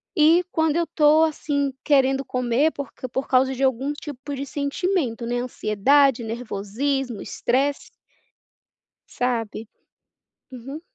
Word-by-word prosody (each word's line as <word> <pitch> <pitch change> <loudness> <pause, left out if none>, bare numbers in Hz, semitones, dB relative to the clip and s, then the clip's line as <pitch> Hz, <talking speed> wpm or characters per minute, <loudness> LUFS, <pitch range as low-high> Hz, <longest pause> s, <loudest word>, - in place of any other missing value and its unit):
e 325 +2 +5
quando 320 0 +1
eu 340 - 0
tô 310 0 +4
assim, 285 -3 -1
querendo 270 -2 +3
comer 250 +5 +1
porque 270 -2 -7
por 265 +2 -3
causa 260 +1 +3
de 260 - -6
algum 265 +1 +1
tipo 290 -1 -7
de 275 0 -4
sentimento, 280 -3 -2
né. 245 +1 -1
Ansiedade, 250 +3 +2
nervosismo, 235 +2 -3
estresse 275 +3 -1 1.2
sabe? 230 -3 -3 0.9
Uhum. 265 +5 -8
270 Hz, 115 wpm, -23 LUFS, 245-290 Hz, 1.2 s, e